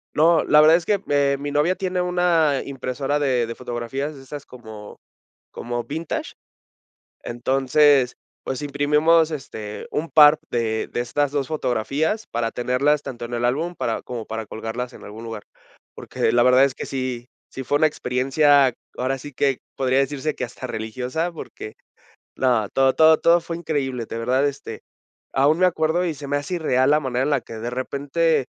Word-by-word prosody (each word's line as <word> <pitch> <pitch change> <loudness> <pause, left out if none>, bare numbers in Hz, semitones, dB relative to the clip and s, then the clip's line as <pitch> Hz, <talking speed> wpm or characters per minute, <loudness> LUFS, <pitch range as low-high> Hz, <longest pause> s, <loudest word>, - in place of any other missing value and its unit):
No, 160 +1 +4
la 150 - +5
verdad 155 +2 +7
es 170 0 -4
que, 205 -2 +1
eh, 140 -1 +2
mi 145 +1 -4
novia 150 +6 +1
tiene 185 -1 -2
una 175 -5 +2
impresora 135 +1 -2
de 130 -5 +1
de 115 - -6
fotografías 125 +5 -4
de 135 - -12
esas 145 +2 -9
como 110 -4 -11 0.5
como 120 0 -4
vintage. 155 +4 -5 0.9
Entonces, 135 +2 +2 0.3
pues, 130 +2 -4
imprimimos, 150 +3 +3
este, 110 -8 -7
un 160 +2 -2
par 150 0 +7
de 110 -2 -1
de - - -4
estas 135 +4 0
2 145 -2 -1
fotografías 155 - -1
para 115 -1 -2
tenerlas 130 +5 +1
tanto 120 -4 -7
en 120 - -8
el 120 0 0
álbum, 160 +8 -1
para 115 - -2
como 120 -3 -6
para 110 0 -4
colgarlas 115 +4 -5
en - - -13
algún 110 +2 -9
lugar. 110 -2 -7 0.5
Porque - - -1
la 120 0 +4
verdad 125 +1 +6
es 135 -2 -3
que - - -6
sí 130 -2 -4 0.2
sí 135 - -7
fue 145 - +1
una 155 +1 +4
experiencia, 135 0 +2 0.2
ahora 130 +2 -1
sí 145 +2 -9
que 135 0 0 0.2
podría 130 0 +1
decirse 145 +2 -1
que - - -4
hasta 125 +1 -6
religiosa, 125 +10 -3
porque 155 -8 -9 0.6
no, 120 -5 +1
todo, 135 0 +3
todo, 160 0 +6
todo 170 +1 +5
fue 170 - -5
increíble, 135 -7 -2
de - - -6
verdad, 130 +4 +1
este, 140 - -7 0.5
aún 145 +4 +3
me 185 - +5
acuerdo, 165 0 +1
y 165 - -2
se 145 0 -9
me 145 +1 +1
hace 145 +5 -5
irreal 130 -6 +1
la 150 - +5
manera 130 -2 -1
en 150 - -1
la 140 -3 +2
que - - -10
de 110 +2 -5
repente 140 +4 0
135 Hz, 180 wpm, -22 LUFS, 125-150 Hz, 0.9 s, verdad